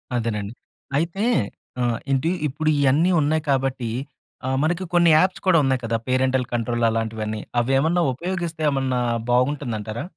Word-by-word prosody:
అదేనండి. 110 Hz, -3 st, -2 dB, 0.4 s
అయితే, 170 Hz, +6 st, -1 dB, 0.6 s
ఆహ్, 120 Hz, -1 st, +1 dB
ఏంటీ 135 Hz, +5 st, +1 dB, 0.2 s
ఇప్పుడు 155 Hz, +3 st, -1 dB
ఇయన్నీ 145 Hz, +6 st, +3 dB
ఉన్నాయి 155 Hz, +2 st, +1 dB
కాబట్టీ 135 Hz, -3 st, -1 dB, 0.6 s
ఆహ్, 130 Hz, -, 0 dB
మనకి 175 Hz, +3 st, 0 dB
కొన్ని 170 Hz, -1 st, +5 dB
యాప్స్ 180 Hz, +4 st, +2 dB
కూడా 185 Hz, -3 st, +5 dB
ఉన్నాయి 130 Hz, -1 st, +1 dB
కదా! 115 Hz, 0 st, 0 dB
పేరెంటల్ 130 Hz, 0 st, +1 dB
కంట్రోల్ 120 Hz, 0 st, -1 dB
అలాంటివన్నీ, 110 Hz, -1 st, -2 dB, 0.2 s
అవేమన్నా 135 Hz, +8 st, +2 dB
ఉపయోగిస్తే 170 Hz, +1 st, -4 dB
ఏమన్నా 135 Hz, -2 st, 0 dB, 0.3 s
బాగుంటుందంటారా? 120 Hz, -3 st, -1 dB
130 Hz, 130 wpm, -23 LUFS, 120-160 Hz, 0.6 s, కొన్ని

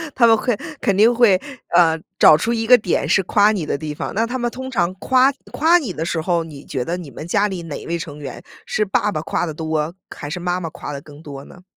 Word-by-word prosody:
他 235 Hz, -3 st, +5 dB
们 225 Hz, -, +6 dB
会 240 Hz, 0 st, 0 dB, 0.3 s
肯 200 Hz, -, +1 dB
定 225 Hz, +4 st, +5 dB
会， 225 Hz, -6 st, +4 dB, 0.4 s
嗯， 165 Hz, -2 st, +4 dB, 0.2 s
找 155 Hz, -, +8 dB
出 230 Hz, +10 st, -1 dB
一 225 Hz, -1 st, -1 dB
个 250 Hz, 0 st, +8 dB
点 195 Hz, -5 st, -1 dB
是 195 Hz, -, +3 dB
夸 205 Hz, +3 st, +3 dB
你 185 Hz, -8 st, -2 dB
的 140 Hz, -, -2 dB
地 150 Hz, -1 st, -5 dB
方。 -, -, -5 dB
那 225 Hz, -, +2 dB
他 250 Hz, +3 st, -3 dB
们 240 Hz, -1 st, -1 dB
通 260 Hz, +1 st, -7 dB
常 185 Hz, -8 st, 0 dB
夸 260 Hz, +6 st, +3 dB, 0.2 s
夸 330 Hz, +4 st, +4 dB
你 245 Hz, -, -4 dB
的 160 Hz, -, -4 dB
时 170 Hz, -, -2 dB
候， 170 Hz, 0 st, 0 dB
你 150 Hz, -3 st, -11 dB
觉 130 Hz, -3 st, -3 dB
得 170 Hz, +6 st, -3 dB
你 165 Hz, -6 st, -9 dB
们 140 Hz, -, -8 dB
家 200 Hz, +4 st, +2 dB
里 190 Hz, -3 st, -5 dB
哪 155 Hz, -3 st, -7 dB
位 170 Hz, -, -1 dB
成 150 Hz, -3 st, -7 dB
员 140 Hz, -2 st, -8 dB, 0.2 s
是 215 Hz, -, 0 dB
爸 205 Hz, +2 st, 0 dB
爸 155 Hz, -, -3 dB
夸 170 Hz, -, -2 dB
得 160 Hz, -, -5 dB
多， 155 Hz, +1 st, -2 dB, 0.2 s
还 145 Hz, -, -7 dB
是 180 Hz, -, -4 dB
妈 180 Hz, +1 st, -1 dB
妈 165 Hz, -, -5 dB
夸 150 Hz, -, -8 dB
得 140 Hz, -1 st, -6 dB
更 145 Hz, +1 st, -14 dB
多 140 Hz, -3 st, -9 dB
呢？ 180 Hz, -, -16 dB
175 Hz, 280 characters per minute, -20 LUFS, 155-225 Hz, 0.4 s, 找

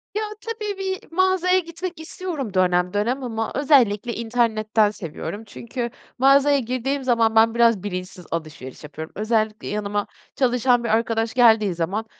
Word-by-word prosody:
Ya, 425 Hz, -, 0 dB, 0.2 s
tabii 430 Hz, -3 st, -4 dB
bir 380 Hz, -2 st, -4 dB
mağazaya 370 Hz, +1 st, +3 dB
gitmek 340 Hz, 0 st, -6 dB
istiyorum 320 Hz, -, -5 dB
dönem 180 Hz, -1 st, +2 dB
dönem 240 Hz, +6 st, -1 dB
ama 225 Hz, -2 st, -3 dB
özellikle 245 Hz, -6 st, +3 dB
internetten 220 Hz, -2 st, +1 dB
seviyorum 205 Hz, +3 st, -7 dB
çünkü 235 Hz, +3 st, -5 dB, 0.3 s
mağazaya 275 Hz, +2 st, +5 dB
girdiğim 255 Hz, +3 st, -2 dB
zaman 230 Hz, -3 st, +2 dB
ben, 225 Hz, +1 st, +5 dB
biraz 230 Hz, -5 st, +3 dB
bilinçsiz 180 Hz, -2 st, -6 dB
alışveriş 155 Hz, -6 st, -6 dB
yapıyorum. 150 Hz, +2 st, -8 dB
Özellikle 215 Hz, +1 st, -1 dB
yanıma 205 Hz, 0 st, -2 dB, 0.3 s
çalışan 245 Hz, -1 st, +2 dB
bir 235 Hz, -, -2 dB
arkadaş 225 Hz, 0 st, 0 dB
geldiği 220 Hz, -6 st, +4 dB
zaman 190 Hz, +7 st, -2 dB
230 Hz, 140 wpm, -22 LUFS, 205-275 Hz, 0.3 s, mağazaya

